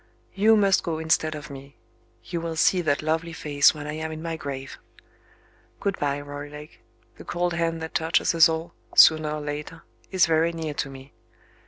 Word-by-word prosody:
You 215 +3 +4
must 195 -2 +3
go 165 -2 -3
instead 160 -1 0
of 150 -1 -9
me; 140 +1 -11 0.5
you 170 -2 -4
will 165 -1 -4
see 180 +3 +3
that 150 -3 0
lovely 165 +2 -1
face 145 -1 +3
when 145 -1 -7
I 150 - -4
am 160 +1 -4
in 155 - -6
my 165 0 -4
grave. 135 -3 -7 1.0
Good 200 -1 -2
bye, 145 -1 -1
Roylake. 145 +1 -9 0.4
The - - -11
cold 175 0 -2
hand 165 -1 -1
that 160 - -7
touches 160 +2 +1
us 165 0 +6
all, 160 +1 -4 0.2
sooner 155 -1 +7
or 150 0 -4
later, 150 +2 -6 0.3
is 185 -2 +3
very 165 +1 +2
near 160 -2 -4
to 145 - -3
me. 135 0 -12
160 Hz, 185 wpm, -25 LUFS, 145-165 Hz, 1.0 s, sooner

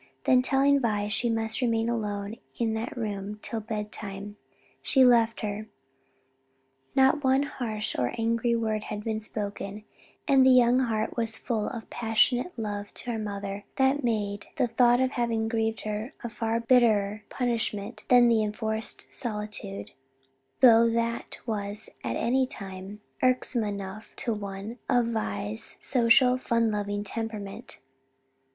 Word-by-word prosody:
Then 255 -1 +5
telling 275 +2 +3
Vi 210 -4 0
she 225 +3 +1
must 225 +1 +1
remain 230 -2 +1
alone 210 -2 -3 0.2
in 225 -2 0
that 225 +3 -4
room 210 -2 -4
till 230 - -1
bedtime, 210 -2 -5 0.5
she 265 -2 +4
left 230 -2 +4
her. 210 0 -4 1.3
Not 270 +2 +4
one 265 +1 +3
harsh 225 -7 -3
or 125 -1 0
angry 230 +1 +1
word 220 -2 -1
had 210 -1 -5
been 220 -1 -2
spoken, 205 -1 -5 0.4
and 270 -3 +6
the 260 - +6
young 250 -1 +6
heart 225 -4 -1
was 225 -2 -1
full 225 -4 -2
of 235 -3 -5
a - - -23
passionate 240 +6 +1
love 205 -2 -4
to 245 - -3
her 225 - -2
mother 200 -1 -5
that 265 +2 +2
made 205 -3 -1
the 265 - +2
thought 240 +1 +4
of 260 0 +2
having 230 -3 0
grieved 225 -1 -1
her 215 +3 -4
a 235 - -3
far 225 +1 -1
bitterer 220 -4 +3
punishment 230 -5 -2
than 245 -1 +6
the 230 -2 +4
enforced 220 +1 0
solitude, 210 - -4 0.7
though 230 -2 +7
that 230 0 -1
was 210 -2 -4
at 115 -1 -2
any 255 - +1
time 195 -3 -7 0.2
irksome 255 -2 +1
enough 200 0 -6
to 235 - -1
one 205 +3 -6
of 245 -2 +3
Vi's 105 - -4
social, 250 0 +4
fun 230 -3 +1
loving 205 0 -2
temperament. 210 -2 -5
225 Hz, 145 wpm, -27 LUFS, 210-240 Hz, 1.3 s, though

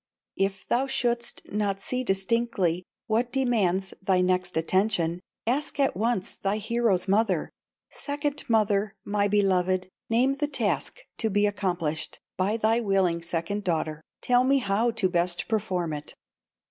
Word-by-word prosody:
"If 195 -1 -1
thou 260 +3 +1
shouldst 240 -3 -1
not 205 -2 0
see 255 +5 -2
distinctly 195 -4 0 0.2
What 235 +2 0
demands 210 -8 +1
thy 190 -1 +2
next 180 -1 +1
attention, 175 0 +1 0.3
Ask 275 +4 -1
at 275 - +2
once 220 -1 -1
thy 200 +1 0
hero's 215 -3 +1
mother: 195 -3 +2 0.4
'Second 290 0 -3
mother, 210 -2 +2
my 205 0 +1
beloved, 185 -2 +2 0.2
Name 245 +4 +3
the 295 +1 -1
task 220 - -1 0.2
to 220 - +1
be 205 0 +2
accomplished 180 -6 -1 0.2
By 195 +4 +1
thy 225 +1 +2
willing 190 -6 +1
second 170 +5 -2
daughter, 160 -3 -1 0.2
Tell 245 0 +4
me 275 +2 +4
how 220 -1 +1
to 220 -4 +1
best 175 -1 0
perform 185 -7 -1
it. 150 0 -7
205 Hz, 140 wpm, -27 LUFS, 185-235 Hz, 0.4 s, Tell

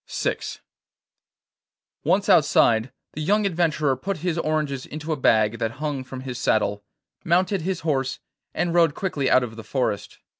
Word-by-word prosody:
VI - - -1 1.7
Once 200 +2 +2
outside, 135 - +4 0.2
the 155 - -5
young 205 +6 +2
adventurer 155 -6 +1
put 195 +9 -4
his 175 -3 +1
oranges 150 -4 -1
into 155 +1 -6
a - - +1
bag 110 -4 +2
that 115 0 -1
hung 145 -1 -3
from 130 0 -8
his 130 -2 -6
saddle, 105 -3 +1 0.4
mounted 185 +2 +2
his 185 +2 -2
horse, 135 -5 -1 0.3
and 175 -1 -1
rode 165 -3 +4
quickly 150 -9 -1
out 130 0 +5
of 115 -2 -6
the 115 - -7
forest. 115 -6 -2
150 Hz, 155 wpm, -24 LUFS, 130-170 Hz, 1.7 s, out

